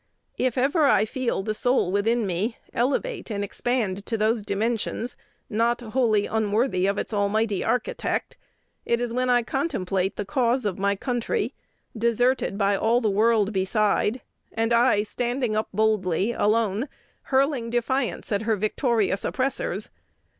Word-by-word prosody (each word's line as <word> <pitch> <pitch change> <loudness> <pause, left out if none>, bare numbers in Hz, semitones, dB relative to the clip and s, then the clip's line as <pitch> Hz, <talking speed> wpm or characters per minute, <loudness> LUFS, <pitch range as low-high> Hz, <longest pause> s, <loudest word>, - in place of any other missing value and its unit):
If 255 -1 0
ever 285 +4 +3
I 220 - +4
feel 245 -4 -2
the 215 - -1
soul 245 -4 +1
within 225 +3 +1
me 195 +5 -2 0.2
elevate 285 - -1
and 205 -2 -2
expand 205 -2 -1
to 225 - -1
those 220 +1 +1
dimensions, 220 +3 -2 0.3
not 230 +2 +1
wholly 220 -3 +1
unworthy 215 -2 +1
of 200 +1 0
its - - -4
almighty 205 0 +1
Architect, 250 - -1 0.5
it 235 - +1
is 240 -1 -2
when 255 +1 0
I 245 -1 +4
contemplate 195 - -1
the 205 - -4
cause 250 +1 +1
of 195 -3 -2
my 200 +1 +1
country, 250 - -2 0.4
deserted 235 -1 +1
by 200 -1 +2
all 225 +4 +2
the 220 -4 +1
world 215 0 +2
beside, 210 +4 +1 0.3
and 225 +1 0
I 235 -3 +4
standing 240 +1 -2
up 215 - 0
boldly, 210 -2 +1
alone, 220 +3 +1 0.4
hurling 265 -3 +1
defiance 240 +1 -1
at 200 0 +1
her 220 0 +1
victorious 215 -1 0
oppressors. 265 +1 -2
225 Hz, 145 wpm, -25 LUFS, 205-245 Hz, 0.5 s, I